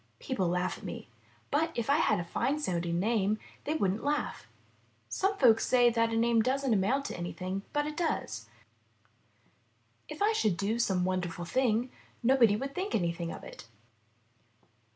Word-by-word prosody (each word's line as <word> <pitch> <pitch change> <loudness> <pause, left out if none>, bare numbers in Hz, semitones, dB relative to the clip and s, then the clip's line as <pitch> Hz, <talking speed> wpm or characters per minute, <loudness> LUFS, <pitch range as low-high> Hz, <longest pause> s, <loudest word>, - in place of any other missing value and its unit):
People 195 -9 -1
laugh 180 +1 -1
at - - -17
me, - - -7 0.4
but 320 +3 +2
if 235 -2 -2
I 280 +1 +4
had 215 - +2
a - - -2
fine 275 - -1
sounding 170 - -1
name 215 0 +1 0.3
they 305 - 0
wouldn't 200 -6 0
laugh. 290 +1 -2 0.6
Some 395 +1 0
folks 230 - +5
say 245 -1 +4
that 230 0 +1
a 225 - 0
name 230 0 +3
doesn't 265 +1 +1
amount 240 +8 +1
to - - -4
any 175 0 -4
thing, 185 +1 -4
but 295 0 0
it 300 +1 -5
does. 345 -2 -2 1.6
If - - -7
I 420 +2 +3
should 215 - +1
do 205 +4 -1
some 190 -6 +1
wonderful 180 -2 -2
thing, 245 +3 +1 0.3
nobody 235 -4 +5
would 275 +5 -4
think 390 +3 -2
anything 170 -2 -1
of - - -8
it. - - -11
230 Hz, 170 wpm, -30 LUFS, 185-275 Hz, 1.6 s, folks